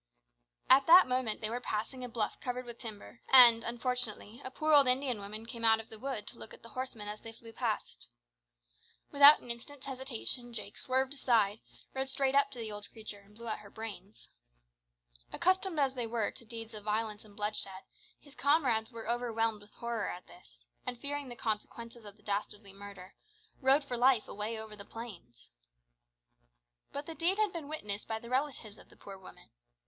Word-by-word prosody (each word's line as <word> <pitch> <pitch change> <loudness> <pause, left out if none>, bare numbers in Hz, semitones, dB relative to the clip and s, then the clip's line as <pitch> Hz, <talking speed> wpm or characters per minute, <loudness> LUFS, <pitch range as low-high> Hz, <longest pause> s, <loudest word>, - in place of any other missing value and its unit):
At 270 +1 +6
that 355 +3 +9
moment 250 -4 0
they 215 - 0
were 240 - -2
passing 245 +4 -3
a 250 - -5
bluff 225 -2 -2
covered 250 0 -4
with 235 -1 -8
timber, 225 +1 -9
and, 235 -3 +10
unfortunately, 240 -1 -1
a - - -5
poor 310 +4 0
old 285 -3 +8
Indian 250 -2 +3
woman 210 +2 -7
came 230 0 -8
out 225 -1 +5
of 225 - -10
the 220 - -10
wood 255 -4 -4
to 235 - -10
look - - -9
at - - -21
the 230 - -11
horsemen 255 -5 -5
as 210 +1 -6
they 225 - -8
flew 225 0 -13
past. 215 - -3 1.0
Without 285 +1 +9
an 245 - -4
instant's 260 +4 -7
hesitation 255 -2 -5
Jake 205 -2 -7
swerved 260 +1 0
aside, 225 -6 +2 0.3
rode 265 0 -2
straight 270 0 +1
up 280 0 +4
to - - -10
the 225 -2 -5
old 205 0 -8
creature, 215 -2 -10
and 200 +1 -21
blew 235 +1 -10
out 215 - -3
her 210 -1 -13
brains. 210 -2 -9 1.0
Accustomed 375 -1 +1
as 270 -2 +2
they 245 -3 -3
were 225 -2 -1
to 235 - -12
deeds 225 0 -8
of 210 -1 -7
violence 215 0 -2
and 210 -2 -16
bloodshed, 205 -2 -2 0.4
his 285 - -18
comrades 255 -5 +2
were 230 -2 -8
overwhelmed 225 -2 0
with 205 0 -18
horror 235 -3 -3
at 180 - -7
this, - - -19 0.2
and, 245 - -5
fearing 285 -1 -4
the 240 - -8
consequences 230 +1 -5
of 205 0 -11
the 210 - -25
dastardly 205 0 -4
murder, 195 -2 -11 0.5
rode 270 +3 +4
for 255 -3 -4
life 245 -2 +4
away 210 +3 -4
over 220 -1 -8
the 200 - -9
plains. 175 - -11 1.4
But 285 +1 -5
the 325 - -6
deed 345 +4 +1
had 430 -3 +1
been 325 -4 -6
witnessed 210 -10 -3
by 220 - -2
the 235 +2 -10
relatives 255 -6 -2
of - - -17
the - - -19
poor 195 -1 -10
woman. 185 - -15
230 Hz, 195 wpm, -32 LUFS, 210-260 Hz, 1.4 s, and